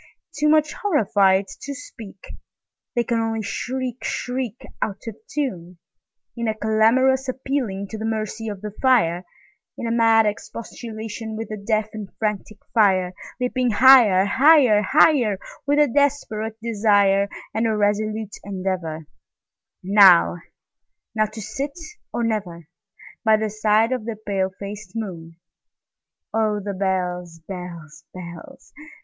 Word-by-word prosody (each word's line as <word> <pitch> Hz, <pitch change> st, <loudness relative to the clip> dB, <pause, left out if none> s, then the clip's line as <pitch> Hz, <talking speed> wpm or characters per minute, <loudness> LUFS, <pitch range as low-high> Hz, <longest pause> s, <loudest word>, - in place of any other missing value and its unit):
Too 300 Hz, +1 st, +2 dB
much 305 Hz, 0 st, +3 dB
horrified 205 Hz, -, +2 dB, 0.2 s
to 280 Hz, 0 st, -6 dB
speak, 215 Hz, -8 st, -11 dB, 0.6 s
They 240 Hz, -, +2 dB
can 235 Hz, -1 st, -1 dB
only 225 Hz, -1 st, -2 dB
shriek, 255 Hz, +3 st, -4 dB
shriek, 250 Hz, -2 st, -4 dB, 0.2 s
Out 200 Hz, -2 st, -3 dB
of 225 Hz, -3 st, -6 dB, 0.2 s
tune, 185 Hz, -, -4 dB, 0.6 s
In 235 Hz, -1 st, -3 dB
a 220 Hz, -, 0 dB
clamorous 250 Hz, +5 st, +2 dB
appealing 255 Hz, -7 st, -3 dB
to 220 Hz, -, -6 dB
the 220 Hz, -, -4 dB
mercy 220 Hz, 0 st, -3 dB
of 205 Hz, -3 st, -6 dB
the 210 Hz, 0 st, -5 dB
fire, 180 Hz, -10 st, +3 dB, 0.5 s
In -, -, -5 dB
a 230 Hz, -, -1 dB
mad 225 Hz, -1 st, +4 dB
expostulation 220 Hz, +1 st, -6 dB
with 225 Hz, +1 st, -5 dB
the 215 Hz, -, -5 dB
deaf 215 Hz, 0 st, 0 dB
and 210 Hz, -3 st, -7 dB
frantic 210 Hz, -1 st, -3 dB, 0.2 s
fire, 190 Hz, -5 st, +3 dB, 0.3 s
Leaping 250 Hz, 0 st, 0 dB
higher, 225 Hz, -5 st, +6 dB
higher, 260 Hz, -1 st, +5 dB
higher, 240 Hz, -2 st, +3 dB, 0.3 s
With 290 Hz, +1 st, +2 dB
a 295 Hz, 0 st, +5 dB
desperate 230 Hz, -5 st, -1 dB
desire, 200 Hz, -3 st, +3 dB, 0.2 s
And 225 Hz, +1 st, +1 dB
a 220 Hz, -1 st, 0 dB
resolute 210 Hz, 0 st, -1 dB
endeavorNow—now 185 Hz, 0 st, +1 dB, 0.9 s
to 220 Hz, 0 st, -8 dB
sit 275 Hz, -, -5 dB, 0.3 s
or 240 Hz, -, -2 dB
never, 190 Hz, -8 st, -3 dB, 0.6 s
By 220 Hz, -2 st, +5 dB
the 215 Hz, -1 st, -2 dB
side 215 Hz, +2 st, +2 dB
of 250 Hz, -4 st, -2 dB
the 230 Hz, -1 st, -4 dB
pale 200 Hz, -3 st, -2 dB
faced 200 Hz, -1 st, -8 dB
moon. 170 Hz, -7 st, -6 dB, 1.0 s
Oh, 215 Hz, -2 st, +1 dB
the 200 Hz, 0 st, -4 dB
bells, 180 Hz, -3 st, -2 dB
bells, 175 Hz, -5 st, -8 dB
bells! 170 Hz, -2 st, -11 dB
215 Hz, 130 wpm, -22 LUFS, 195-235 Hz, 1.0 s, higher